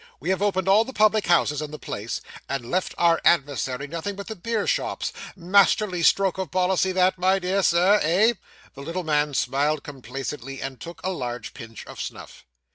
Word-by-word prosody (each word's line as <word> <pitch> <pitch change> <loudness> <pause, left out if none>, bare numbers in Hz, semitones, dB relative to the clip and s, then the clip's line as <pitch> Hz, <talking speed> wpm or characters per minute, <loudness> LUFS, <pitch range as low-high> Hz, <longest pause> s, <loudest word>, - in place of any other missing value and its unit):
We 165 +8 -1
have 190 - -1
opened 190 -2 0
all 200 +3 +6
the 265 - -9
public 215 -1 +3
houses 155 -4 +3
in 150 - -5
the 150 - -7
place, 105 -3 -5 0.3
and 125 -4 -4
left 185 +1 -1
our 170 -1 +3
adversary 140 -4 +1
nothing 170 +7 -5
but 200 0 -7
the 220 - -6
beer 220 +4 -2
shops - - -1 0.2
masterly 190 0 +3
stroke 190 +2 +3
of 190 -4 -3
policy 185 +3 +1
that, 185 0 +2
my 190 +1 +3
dear 190 +1 0
Sir, 185 +4 +4
eh?' 195 +9 +3 0.4
The 140 - -10
little 170 +5 -4
man 150 -2 +1
smiled 140 +4 0
complacently, 135 0 -6
and 135 -1 -6
took 170 0 -9
a 190 - -1
large 120 -8 -5
pinch 115 -2 -10
of - - -8
snuff. - - -9
175 Hz, 190 wpm, -24 LUFS, 140-190 Hz, 0.4 s, all